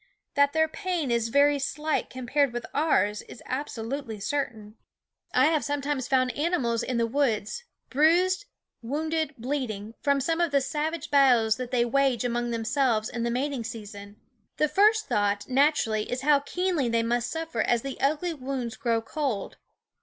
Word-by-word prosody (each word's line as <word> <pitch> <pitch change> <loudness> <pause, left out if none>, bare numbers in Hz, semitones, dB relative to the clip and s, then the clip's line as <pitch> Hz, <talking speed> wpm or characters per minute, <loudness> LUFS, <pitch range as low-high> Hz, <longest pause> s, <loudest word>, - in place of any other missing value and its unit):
That 285 0 +3
their 320 0 +3
pain 330 -4 -2
is 230 -1 +1
very 285 +3 +4
slight 300 +3 -1
compared 260 +1 0
with 240 -1 -4
ours 210 -9 +2
is - - -13
absolutely 250 -3 -4
certain. 215 -3 -3 0.6
I 255 - +4
have 310 -1 +2
sometimes 285 -2 -2
found 255 -1 +2
animals 285 -8 0
in 250 0 -2
the 230 - +2
woods, 230 - -1 0.3
bruised, 355 - +3 0.4
wounded, 310 +4 -2
bleeding, 230 -4 -3
from 280 -1 +2
some 325 +5 0
of 340 - +2
the 285 -1 +3
savage 305 +4 -3
battles 245 -6 +4
that 255 -1 -5
they 245 -2 +2
wage 265 -2 +1
among 240 0 -1
themselves 230 -1 0
in 235 - -4
the 235 - 0
mating 260 +1 -2
season. 205 -3 -9 0.4
The 305 - +3
first 430 +5 +3
thought, 205 0 0
naturally, 260 -6 +2
is 245 0 -2
how 290 0 +4
keenly 335 -2 -1
they 230 0 +1
must 240 +1 0
suffer 325 -8 -3
as 235 0 +1
the 275 -1 -6
ugly 310 +5 +1
wounds 260 -4 -4
grow 230 -4 0
cold. 260 -5 -3
265 Hz, 160 wpm, -27 LUFS, 230-295 Hz, 0.6 s, very